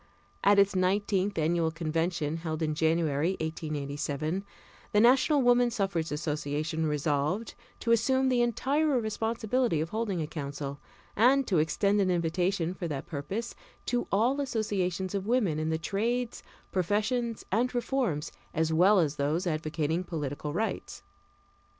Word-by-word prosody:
At 200 +1 +5
its 200 -1 +4
nineteenth 195 +1 +1
annual 165 +1 +2
convention, 165 -1 -1
held 160 -1 -3
in 155 -1 0
January, 160 +1 +1
1887, 155 +1 -3 0.5
the 210 - +5
National 260 +5 +5
Woman 245 0 +4
Suffrage 195 -8 -1
Association 150 +1 -2
resolved 150 +7 -1 0.3
to 230 - 0
assume 260 +4 +3
the 250 -2 +3
entire 270 +4 +1
responsibility 225 -2 0
of 160 +2 -2
holding 215 -4 -2
a 155 - -1
council, 140 -2 -5 0.4
and 260 +5 +4
to 185 -8 +2
extend 200 +6 +2
an 190 - +2
invitation, 175 +1 0
for 180 -2 -4
that 145 -4 -4
purpose, 175 +10 -4 0.3
to 245 0 -1
all 245 +8 +2
associations 195 -7 -1
of 200 0 -2
women 215 -11 +1
in 155 0 -1
the 160 - +1
trades, 230 +8 -2 0.3
professions, 215 +5 0
and 245 +5 +1
reforms, 240 - -1 0.2
as 160 0 +1
well 190 +6 +5
as 155 -5 +1
those 150 +6 0
advocating 155 +1 -1
political 150 -3 -4
rights. 215 +8 -3
180 Hz, 140 wpm, -29 LUFS, 155-225 Hz, 0.5 s, At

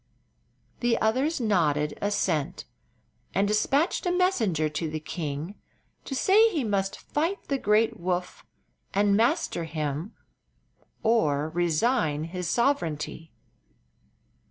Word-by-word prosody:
The 240 -1 +1
others 265 +9 +1
nodded 155 - +1
assent, 180 -5 -1 0.7
and 200 +1 +3
dispatched 275 - +1
a - - +2
messenger 235 - +1
to 155 +1 -3
the 155 0 -4
king 155 +2 -5 0.5
to 270 - -4
say 425 +10 +5
he 320 -10 -1
must 195 -3 -1
fight 330 +7 -2
the 275 -1 0
great 215 +1 +2
Woof 180 +1 -3 0.5
and 200 0 +3
master 230 - +1
him 155 +4 -4 0.9
or 155 -11 +2
resign 165 - +1
his 175 +1 -4
sovereignty. 165 - -1
195 Hz, 110 wpm, -27 LUFS, 160-245 Hz, 0.9 s, say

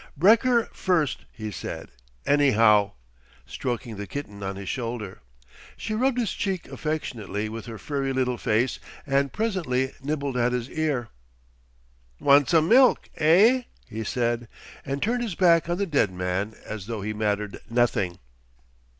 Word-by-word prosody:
"Brekker 230 - +4
first," 165 -7 0
he 110 -2 -6
said, - - -6 0.3
"anyhow," 115 -8 +4 0.5
stroking 120 - -4
the 100 0 -6
kitten 105 -8 -7
on 95 0 -3
his 100 0 -8
shoulder. 115 -5 -4 0.6
She 215 - -4
rubbed 250 +3 +1
his 230 -5 0
cheek 190 -3 -3
affectionately 115 -9 -3
with 115 +2 -7
her 115 -1 -7
furry 140 +2 -2
little 125 -2 0
face 120 +4 +1 0.3
and 140 0 +1
presently 165 - -1
nibbled 140 -2 -2
at 120 0 +2
his 125 0 -3
ear. 145 -7 -1 1.1
"Wan' 145 0 +5
some 160 -2 +3
milk, 255 +4 +5
eh?" 210 +11 +5 0.2
he 110 +1 -5
said, 120 +1 -1 0.4
and 135 +1 -3
turned 240 +3 0
his 220 -7 -3
back 170 -2 +4
on 175 - 0
the 200 - 0
dead 140 - +1
man 90 +4 -2
as 105 -3 -6
though 115 -4 -4
he 110 +1 -2
mattered 105 -1 -2
nothing. 115 -7 +1
130 Hz, 145 wpm, -25 LUFS, 110-165 Hz, 1.1 s, Wan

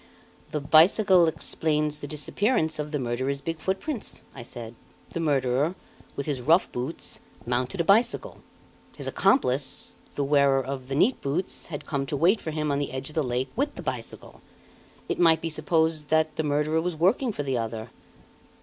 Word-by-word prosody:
"The 150 - -2
bicycle 170 +5 +5
explains 150 -1 -1
the 145 - -6
disappearance 160 - 0
of 150 0 -3
the 150 - 0
murderer's 130 +2 -2
big 165 +2 -4
foot 190 +4 -1
prints," 290 -8 -6
I 130 - -8
said. 115 -1 -7 0.4
"The - - -3
murderer, 145 +1 +1 0.4
with 140 - -3
his 140 -4 -2
rough 165 +8 +3
boots, 125 +7 -4 0.3
mounted 125 +5 -1
a - - +1
bicycle. 235 - +2 0.6
His - - -6
accomplice, 135 - +1 0.2
the 145 - 0
wearer 140 -1 +3
of 130 -1 -5
the 135 - -3
neat 230 - +3
boots, 155 +7 -2
had 145 -4 -6
come 140 -2 -2
to 145 -1 -2
wait 180 +9 +3
for - - -4
him 155 -1 -1
on 140 - +1
the 145 - -2
edge 130 +1 -4
of 150 - -13
the 160 - +2
lake 130 0 -2
with 285 +4 -1
the - - -8
bicycle. - - -6 0.7
It - - -2
might 165 -2 +5
be 165 0 -3
supposed 160 -1 +1
that 155 -1 +2
the - - 0
murderer 150 +2 +1
was 175 0 -2
working 205 - +2
for 145 - -4
the 135 -3 -1
other." 115 0 -5
150 Hz, 185 wpm, -26 LUFS, 135-165 Hz, 0.7 s, bicycle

